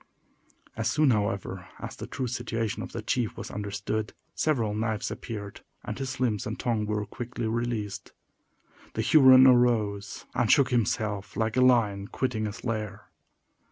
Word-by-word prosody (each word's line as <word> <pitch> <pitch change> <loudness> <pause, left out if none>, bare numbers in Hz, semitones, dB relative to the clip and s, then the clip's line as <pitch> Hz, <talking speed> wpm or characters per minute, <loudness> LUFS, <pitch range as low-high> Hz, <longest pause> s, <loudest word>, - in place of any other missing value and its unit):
As 115 0 0
soon, 150 +1 +3
however, 100 -3 -2
as - - -7
the - - -7
true 130 - -3
situation 115 -3 -2
of - - -7
the 115 - -5
chief 120 -2 -1
was - - -6
understood, 105 +1 -3 0.2
several 120 -9 0
knives 110 0 -2
appeared, 100 -3 -7 0.2
and - - -5
his 130 -1 -4
limbs 110 -6 0
and 110 - -5
tongue 110 -3 0
were 105 -1 -1
quickly 120 0 -5
released. 110 -3 -3 0.8
The - - 0
Huron 130 -3 +8
arose, 115 -5 +2
and - - +2
shook 135 -2 +4
himself 105 -3 -1
like 110 0 0
a 130 - +3
lion 110 -6 +3
quitting 110 -4 -2
his 105 +2 -8
lair. 110 -2 -4
110 Hz, 155 wpm, -27 LUFS, 105-125 Hz, 0.8 s, Huron